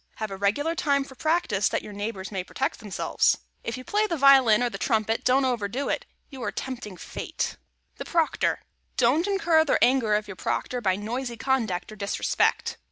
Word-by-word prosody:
Have 215 -2 -4
a - - -4
regular 210 +12 0
time 280 -4 +1
for 270 - -12
practice; 285 - +1
then - - -2
your 210 - -9
neighbors 205 -1 -5
may 190 -3 -2
protect 270 - -3
themselves. 205 -3 +1 0.3
If 230 - -4
you 255 - -8
play 420 +8 +1
the 335 - -2
violin 265 -5 +6
or 245 - +1
the - - -6
trumpet, 220 -2 0
don't 265 +2 +3
overdo 245 +1 -1
it; - - -2 0.2
you 265 -2 -9
are - - -2
tempting 245 -7 -6
Fate. - - -7
[Sidenote: - - -1 0.4
THE - - -6
PROCTOR] 330 -3 +1 0.4
Don't 270 +9 +3
incur 365 -5 +3
the 290 - +2
anger 245 -4 +3
of 210 0 -1
your 195 - -7
Proctor 250 -1 -2
by 190 -4 +2
noisy 235 +4 -4
conduct 225 -7 -1
or - - -9
disrespect. 200 -1 0
245 Hz, 195 wpm, -26 LUFS, 210-275 Hz, 0.4 s, violin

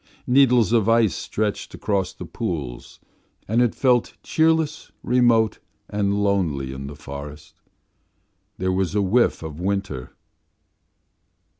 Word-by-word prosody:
Needles 125 -4 +4
of 115 -2 +3
ice 115 -3 +4
stretched 105 -1 -3
across 100 -3 -1
the 90 - -9
pools, 85 - -5 0.5
and 115 +4 +2
it 120 -2 +2
felt 125 -3 +2
cheerless, 160 -1 +1
remote, 120 -3 +3 0.3
and 100 0 0
lonely 80 -10 0
in 70 +1 -7
the 70 - -8
forest. 75 0 -10 1.0
There 95 0 0
was 95 +1 -1
a 105 - +3
whiff 110 -1 +2
of 80 -1 -7
winter. 95 -8 -3
100 Hz, 120 wpm, -23 LUFS, 80-115 Hz, 1.0 s, Needles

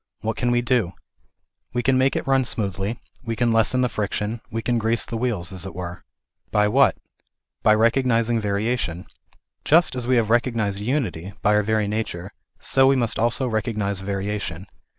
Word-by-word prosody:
What 110 +1 -2
can 120 - 0
we 120 0 +2
do? 115 -7 +1 0.8
We 120 0 -1
can 130 +2 +3
make 130 +1 +2
it - - -2
run 135 -1 +3
smoothly, 100 -1 -2 0.2
we 115 -2 -3
can 120 0 +1
lessen 115 +3 +3
the 125 - +3
friction, 105 +1 -3
we 115 -1 -4
can 120 0 +1
grease 115 +1 0
the 115 - -6
wheels, 110 -7 -1
as 95 -2 -4
it 95 -3 -7
were. 90 -1 -6 0.5
By 105 0 +2
what? 135 +5 +4 0.7
By 110 - +5
recognizing 115 0 +2
variation. 100 -3 -1 0.6
Just 165 +3 +4
as 125 -1 -3
we 130 - +3
have 115 -2 +2
recognized 115 -4 +1
unity 105 - -2
by 105 - +4
our 105 - +4
very 110 0 0
nature, 100 -3 -3 0.3
so 135 0 +3
we 135 - +5
must 120 -4 +1
also 120 +3 +2
recognize 110 -4 -1
variation. 100 -2 -3
110 Hz, 175 wpm, -23 LUFS, 100-120 Hz, 0.8 s, By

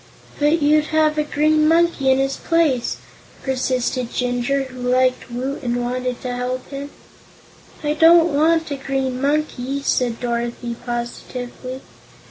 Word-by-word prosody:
"But 300 +2 +2
you'd 300 +1 +4
have 310 -1 +2
a - - +2
green 305 +1 +2
monkey 330 -4 +3
in 260 - +5
his 270 0 0
place," 315 -8 +1 0.5
persisted 255 -2 -1
Jinjur, 250 +2 0
who 255 -1 -10
liked 255 +1 +1
Woot 260 +4 -4
and 240 -3 -1
wanted 250 0 -2
to 250 -1 -3
help 250 +1 -3
him. 280 +1 -6 0.9
"I 295 0 +1
don't 330 +1 +6
want 320 +2 +2
a 280 - -2
green 265 -1 -2
monkey," 280 -2 -1
said 245 -4 0
Dorothy 235 0 -3
positively. 245 +2 -5
265 Hz, 135 wpm, -21 LUFS, 250-300 Hz, 0.9 s, don't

